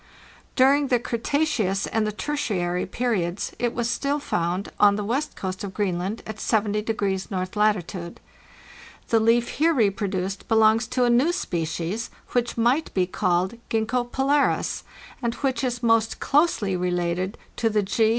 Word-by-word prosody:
During 275 Hz, +2 st, +4 dB
the 250 Hz, -, +3 dB
Cretaceous 235 Hz, -5 st, 0 dB
and 220 Hz, -1 st, 0 dB
the -, -, -1 dB
Tertiary 200 Hz, -9 st, -2 dB
periods 195 Hz, -5 st, -1 dB
it 240 Hz, -1 st, +1 dB
was 235 Hz, -1 st, 0 dB
still 280 Hz, +4 st, 0 dB
found 180 Hz, -8 st, -2 dB
on 205 Hz, -1 st, +6 dB
the 210 Hz, -, -2 dB
west 260 Hz, +8 st, -2 dB
coast 185 Hz, 0 st, -4 dB
of 195 Hz, -2 st, -6 dB
Greenland 195 Hz, +1 st, -2 dB
at 220 Hz, -1 st, -6 dB
70° 210 Hz, -3 st, 0 dB
north 185 Hz, 0 st, -3 dB
latitude. 190 Hz, -4 st, 0 dB, 0.9 s
The 225 Hz, -, +4 dB
leaf 230 Hz, +2 st, +3 dB
here 325 Hz, +1 st, +4 dB
reproduced 195 Hz, -4 st, -1 dB
belongs 220 Hz, 0 st, +4 dB
to 250 Hz, +1 st, 0 dB
a 245 Hz, -, +3 dB
new 260 Hz, +8 st, +4 dB
species, 175 Hz, -, -3 dB, 0.2 s
which 240 Hz, -1 st, -1 dB
might 245 Hz, +7 st, +2 dB
be 185 Hz, -2 st, +3 dB
called 185 Hz, +3 st, 0 dB
Gzxgko 240 Hz, +2 st, 0 dB
polaris, 280 Hz, +2 st, +1 dB, 0.4 s
and 235 Hz, -1 st, -1 dB
which 265 Hz, -3 st, -1 dB
is 245 Hz, -1 st, -2 dB
most 225 Hz, -1 st, +2 dB
closely 275 Hz, -, +2 dB
rélated 180 Hz, +2 st, -1 dB, 0.2 s
to 225 Hz, -, +2 dB
the 210 Hz, -1 st, +1 dB
G. 220 Hz, +3 st, +2 dB
220 Hz, 150 wpm, -24 LUFS, 190-245 Hz, 0.9 s, on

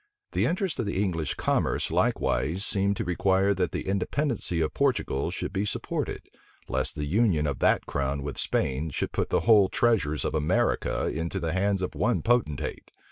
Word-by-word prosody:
The -, -, +1 dB
interest 185 Hz, 0 st, -1 dB
of 115 Hz, -, -1 dB
the 100 Hz, -, -1 dB
English 85 Hz, -7 st, -1 dB
commerce -, -, 0 dB
likewise 85 Hz, +8 st, +1 dB
seemed 100 Hz, 0 st, +1 dB
to -, -, -1 dB
require 95 Hz, +3 st, +2 dB
that 90 Hz, -2 st, -1 dB
the -, -, -4 dB
independency 100 Hz, -, -1 dB
of 80 Hz, -2 st, 0 dB
Portugal 125 Hz, -, 0 dB
should 95 Hz, -, -4 dB
be 100 Hz, 0 st, 0 dB
supported, 105 Hz, -, -3 dB, 0.4 s
lest 65 Hz, +3 st, -1 dB
the 75 Hz, -1 st, -3 dB
union 90 Hz, -2 st, +2 dB
of 70 Hz, -3 st, -2 dB
that -, -, +3 dB
crown 70 Hz, 0 st, -2 dB
with 70 Hz, -1 st, -5 dB
Spain 70 Hz, +5 st, -1 dB
should 70 Hz, -, -3 dB
put -, -, -1 dB
the -, -, +2 dB
whole 105 Hz, -4 st, +5 dB
treasures 95 Hz, -13 st, +1 dB
of -, -, -1 dB
America 75 Hz, -1 st, +1 dB
into 80 Hz, +2 st, -2 dB
the 80 Hz, -1 st, -2 dB
hands 95 Hz, 0 st, +1 dB
of 90 Hz, -, -3 dB
one 120 Hz, +3 st, 0 dB
potentate. 115 Hz, -, 0 dB
95 Hz, 180 wpm, -27 LUFS, 75-100 Hz, 0.4 s, whole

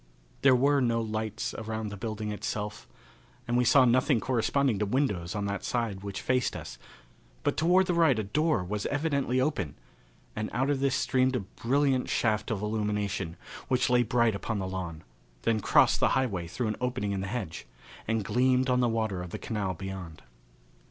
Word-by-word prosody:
There 135 Hz, -2 st, +6 dB
were 140 Hz, +2 st, +3 dB
no 115 Hz, -2 st, +2 dB
lights 110 Hz, -1 st, -3 dB
around 110 Hz, -1 st, -4 dB
the 100 Hz, -, -6 dB
building 110 Hz, 0 st, -4 dB
itself, 105 Hz, 0 st, -4 dB, 0.6 s
and 120 Hz, -, 0 dB
we 125 Hz, -, +4 dB
saw 130 Hz, +2 st, +6 dB
nothing 125 Hz, +1 st, +3 dB
corresponding 125 Hz, +1 st, +1 dB
to 105 Hz, -, +1 dB
windows 105 Hz, -9 st, 0 dB
on 100 Hz, -1 st, -1 dB
that 100 Hz, -1 st, -3 dB
side 115 Hz, -6 st, -2 dB
which 100 Hz, -1 st, -5 dB
faced 125 Hz, -1 st, +1 dB
us, -, -, -8 dB, 0.6 s
but -, -, +1 dB
toward 180 Hz, +4 st, +4 dB
the 180 Hz, -, 0 dB
right 165 Hz, -7 st, +4 dB
a 110 Hz, -, 0 dB
door 150 Hz, -, +1 dB
was 100 Hz, +3 st, -3 dB
evidently 140 Hz, -4 st, 0 dB
open, 130 Hz, -, -1 dB, 0.6 s
and 105 Hz, 0 st, -3 dB
out 130 Hz, +3 st, +1 dB
of 140 Hz, -, 0 dB
this 135 Hz, -1 st, +1 dB
streamed 130 Hz, -1 st, +2 dB
a 125 Hz, -, 0 dB
brilliant 130 Hz, +6 st, 0 dB
shaft 110 Hz, -2 st, +1 dB
of 105 Hz, -2 st, -2 dB
illumination, 105 Hz, -5 st, -2 dB, 0.3 s
which 125 Hz, -1 st, +1 dB
lay 125 Hz, 0 st, +5 dB
bright 120 Hz, -1 st, +2 dB
upon 105 Hz, +2 st, -3 dB
the 95 Hz, -1 st, -2 dB
lawn, 90 Hz, -4 st, -5 dB, 0.4 s
then 110 Hz, -1 st, +2 dB
crossed -, -, +4 dB
the -, -, +3 dB
highway 100 Hz, -10 st, -1 dB
through 110 Hz, +6 st, -2 dB
an 105 Hz, -, -3 dB
opening 125 Hz, -5 st, -1 dB
in 100 Hz, -1 st, -2 dB
the 100 Hz, -, -3 dB
hedge, 95 Hz, -, -5 dB, 0.4 s
and 110 Hz, -2 st, 0 dB
gleamed 130 Hz, +2 st, +2 dB
on 125 Hz, -, +3 dB
the 120 Hz, -1 st, +3 dB
water 110 Hz, -5 st, -1 dB
of 90 Hz, -, -6 dB
the -, -, -5 dB
canal 100 Hz, -5 st, -3 dB
beyond. 95 Hz, -3 st, -7 dB
110 Hz, 185 wpm, -29 LUFS, 100-130 Hz, 0.6 s, There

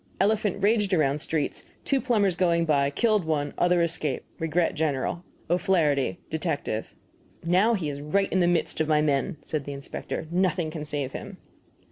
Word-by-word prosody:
Elephant 205 Hz, -1 st, +1 dB
raged 205 Hz, -2 st, +3 dB
around 145 Hz, -2 st, +1 dB
streets; 155 Hz, -2 st, -1 dB, 0.2 s
two 275 Hz, -2 st, +1 dB
plumbers 210 Hz, -8 st, +2 dB
going 170 Hz, -2 st, +2 dB
by, 140 Hz, -3 st, +2 dB
killed 215 Hz, +6 st, +2 dB
one 150 Hz, -2 st, -1 dB
other 175 Hz, -1 st, +3 dB
escaped. 160 Hz, -5 st, -1 dB
Regret 165 Hz, +1 st, +1 dB
general. 155 Hz, +2 st, -1 dB, 0.2 s
O'FLAHERTY, 165 Hz, -5 st, +2 dB
Detective. 155 Hz, -9 st, -3 dB, 0.5 s
"Now 190 Hz, +7 st, +4 dB
he 175 Hz, -7 st, -2 dB
is 145 Hz, -1 st, -4 dB
right 195 Hz, +7 st, 0 dB
in 190 Hz, -, +3 dB
the 175 Hz, -, +3 dB
midst 170 Hz, -2 st, +1 dB
of 155 Hz, -, +1 dB
my 150 Hz, -1 st, +3 dB
men," 150 Hz, +4 st, 0 dB
said 150 Hz, -3 st, -3 dB
the 145 Hz, -, -5 dB
inspector. 140 Hz, +3 st, -5 dB
"Nothing 175 Hz, -2 st, +1 dB
can 155 Hz, -1 st, -5 dB
save 145 Hz, -3 st, -3 dB
him." -, -, -8 dB
165 Hz, 165 wpm, -26 LUFS, 150-185 Hz, 0.5 s, Now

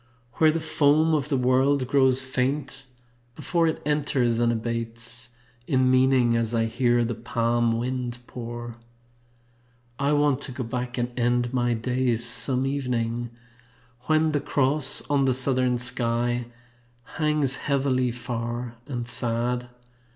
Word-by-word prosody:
Where 155 Hz, -1 st, +5 dB
the 165 Hz, -, -2 dB
foam 155 Hz, +1 st, +2 dB
of 150 Hz, -1 st, 0 dB
the 140 Hz, -, +1 dB
world 130 Hz, +1 st, +2 dB
grows 130 Hz, -1 st, +4 dB
faint 130 Hz, +1 st, -3 dB, 0.5 s
before 170 Hz, -1 st, 0 dB
It 160 Hz, -, -3 dB
enters, 140 Hz, -6 st, +1 dB
and 120 Hz, 0 st, +2 dB
abates 115 Hz, +1 st, -4 dB, 0.4 s
In 130 Hz, -1 st, +2 dB
meaning 130 Hz, -2 st, +3 dB
as 115 Hz, 0 st, 0 dB
I 115 Hz, 0 st, +2 dB
hear 120 Hz, +1 st, +1 dB
the 120 Hz, -, -2 dB
palm 115 Hz, 0 st, 0 dB
wind 125 Hz, 0 st, -3 dB
pour. 120 Hz, -1 st, -7 dB, 1.2 s
I 140 Hz, +2 st, +1 dB
want 145 Hz, -2 st, +2 dB
to 135 Hz, -, -4 dB
go 130 Hz, 0 st, -5 dB
back 125 Hz, +1 st, -4 dB
and 120 Hz, 0 st, -2 dB
end 120 Hz, +1 st, +1 dB
my 120 Hz, -2 st, +1 dB
days 120 Hz, 0 st, 0 dB
Some 130 Hz, +2 st, 0 dB
evening 120 Hz, -4 st, -2 dB, 0.8 s
when 155 Hz, 0 st, +3 dB
the 145 Hz, -2 st, -1 dB
Cross 140 Hz, 0 st, +1 dB
On 140 Hz, -1 st, +2 dB
the 130 Hz, -2 st, +2 dB
southern 130 Hz, -1 st, +2 dB
sky 120 Hz, 0 st, 0 dB, 0.7 s
hangs 150 Hz, -4 st, +2 dB
heavily 135 Hz, -3 st, 0 dB
far 120 Hz, 0 st, -5 dB
and 120 Hz, -4 st, -4 dB
sad. 120 Hz, +1 st, +1 dB
125 Hz, 135 wpm, -25 LUFS, 120-135 Hz, 1.2 s, Where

